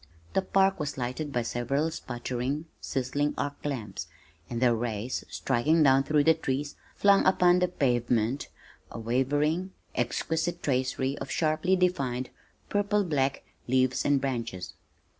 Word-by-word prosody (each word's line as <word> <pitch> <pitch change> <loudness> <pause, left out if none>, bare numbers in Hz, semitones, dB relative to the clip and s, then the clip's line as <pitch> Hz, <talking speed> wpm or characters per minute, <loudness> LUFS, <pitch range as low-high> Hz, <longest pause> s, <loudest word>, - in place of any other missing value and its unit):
The - - +3
park 195 0 +2
was 150 -2 -3
lighted 130 +4 -3
by 120 -3 0
several 135 +7 -1
sputtering, 130 +1 -3
sizzling 145 +2 -1
arc 145 0 -3
lamps, 110 - -4 0.4
and 120 - -3
their 125 -1 +4
rays 115 +1 -2
striking 150 +6 +2
down 135 -1 +6
through 150 0 +3
the 160 - +6
trees, 145 -2 -2 0.2
flung 200 -1 +5
upon 180 -1 +4
the 180 - +3
pavement 120 -5 0 0.4
a - - -7
wavering, 145 - 0 0.2
exquisite 160 +7 -1
tracery 130 0 0
of - - -6
sharply 160 +4 +1
defined, 135 -9 0 0.4
purple 205 0 +1
black 140 -6 0 0.2
leaves 130 0 +2
and 145 -1 +3
branches. 115 -9 -3
140 Hz, 135 wpm, -28 LUFS, 125-160 Hz, 0.4 s, down